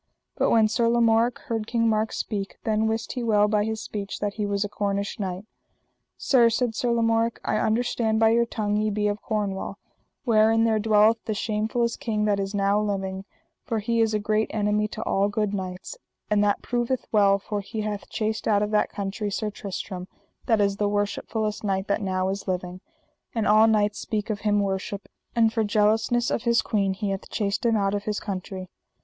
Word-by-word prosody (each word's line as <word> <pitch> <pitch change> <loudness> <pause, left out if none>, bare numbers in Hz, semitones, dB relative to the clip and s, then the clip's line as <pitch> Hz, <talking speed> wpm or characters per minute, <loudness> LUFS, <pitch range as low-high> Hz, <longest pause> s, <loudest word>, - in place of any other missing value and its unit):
But - - +2
when 220 -1 +5
Sir 230 +1 +1
Lamorak 235 0 +3
heard 225 -2 -3
King 230 -1 +1
Mark 220 0 +1
speak, 200 -2 -4
then 220 0 +1
wist 225 0 -2
he 250 - -4
well 210 -3 +3
by 210 -1 +2
his 220 0 -3
speech 205 -1 -5
that 205 -1 -2
he 210 -1 -2
was 200 0 0
a - - -2
Cornish 200 0 -2
knight. 190 0 -4 0.7
Sir, 240 -4 +4
said 230 0 0
Sir 240 +2 -1
Lamorak, 230 0 +1
I - - +1
understand 220 0 +1
by 225 0 +5
your 235 +1 +3
tongue 210 -2 -1
ye 215 0 +1
be 210 0 0
of 205 0 -2
Cornwall, 200 -2 -3 0.5
wherein 225 -1 +4
there 220 -1 +2
dwelleth 215 +1 +4
the 220 - -1
shamefullest 220 +3 -1
king 215 -2 -1
that 205 -1 +1
is 195 +1 -3
now 200 +1 +2
living, 195 -2 -3 0.4
for 225 - -2
he 230 +2 0
is 220 -1 +2
a - - +1
great 215 +1 0
enemy 210 0 +1
to 215 +1 -6
all 200 +1 +1
good 205 0 -1
knights; 185 - -5 0.3
and 205 -1 +4
that 205 -1 +1
proveth 240 +1 -1
well, 200 -2 +4
for 205 +1 -4
he 215 +2 -5
hath 210 -1 -4
chased 220 -1 -2
out 205 -1 +3
of 210 - -2
that 210 - +2
country 200 +1 -3
Sir 210 +1 -2
Tristram, 190 -2 -6 0.4
that 225 -3 +3
is 200 -1 +1
the 205 -1 +1
worshipfullest 210 +1 -2
knight 195 -2 0
that 200 - +1
now 185 -1 0
is 195 +1 -4
living, 180 0 -3 0.5
and 225 -2 0
all 215 +1 +6
knights 210 -1 +2
speak 215 0 -2
of 205 - -3
him 205 -1 +2
worship; 195 +1 -3 0.3
and 225 -1 +3
for 225 - +1
jealousness 215 +3 +2
of - - 0
his 235 0 +2
queen 195 -3 0
he 205 0 -2
hath 195 - -5
chased 205 +2 -1
him 230 - +3
out 195 -1 +1
of 205 0 -2
his 210 -1 -1
country. 190 -1 -5
210 Hz, 205 wpm, -25 LUFS, 200-225 Hz, 0.7 s, all